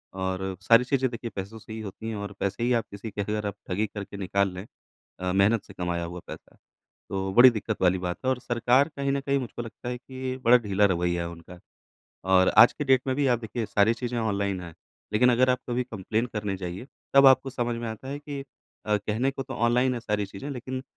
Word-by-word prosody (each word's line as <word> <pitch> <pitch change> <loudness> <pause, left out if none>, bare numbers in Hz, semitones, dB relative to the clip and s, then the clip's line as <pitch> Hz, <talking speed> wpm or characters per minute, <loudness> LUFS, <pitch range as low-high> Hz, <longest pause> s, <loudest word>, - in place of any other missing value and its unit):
और 95 0 -2
सारी 115 +5 +6
चीज़ें 130 0 +1
देखिए 115 0 -6
पैसों 100 +4 -6
से 110 - -10
ही 110 - -6
होती 110 +2 -7
हैं 110 - -3
और 100 0 -5
पैसे 100 +4 -2
ही 125 +1 +2
आप 115 -2 +1
किसी 100 +2 -7
के 105 - -3
अगर 105 +1 -2
आप 100 - -4
ठगी 105 +4 0
करके 100 -1 -8
निकाल 100 0 0
लें 90 +3 -7 0.5
अ, 90 0 -1
मेहनत 100 +3 +3
से 100 - -14
कमाया 90 -2 -2
हुआ 90 +1 -7
पैसा - - -11 0.5
तो 95 0 -2
बड़ी 125 +3 +9
दिक्कत 110 -2 -4
वाली 95 0 +4
बात 90 -1 -3
है। - - +3
और 130 -1 0
सरकार 125 +5 +2
कहीं 140 0 0
न 140 - 0
कहीं 140 0 +1
मुझको 120 -1 -5
लगता 120 +1 -7
है 125 - -3
कि 130 +1 -6
बड़ा 125 +1 +8
ढीला 105 -3 +1
रवैया 85 -2 +1
है 85 - -4
उनका। 85 +1 -12 0.7
और 95 0 +4
आज 120 - +9
के 145 - -4
डेट 130 -2 +4
में 130 - +1
भी 145 -1 +2
आप 120 -3 +3
देखिए 110 0 -4
सारी 105 +3 +3
चीज़ें 120 0 -3
ऑनलाइन 100 -3 -1
है 85 -2 -9 0.4
लेकिन 125 +4 +5
अगर 130 +2 +4
आप 125 - +2
कभी 125 +1 0
कंप्लेन 110 +1 -2
करने 105 -4 -3
जाइए 90 +5 -6 0.3
तब 140 0 +8
आपको 130 0 +5
समझ 120 -1 -2
में 115 -1 -4
आता 110 +4 -7
है 140 +1 -4
कि 145 -1 -6 0.5
अ, 105 0 +3
कहने 110 +6 -1
को 135 0 -5
तो - - -7
ऑनलाइन 125 +2 +2
है 120 - -4
सारी 105 -3 -1
चीज़ें 100 +8 -8
लेकिन 130 0 -5
110 Hz, 235 wpm, -26 LUFS, 95-125 Hz, 0.7 s, बड़ी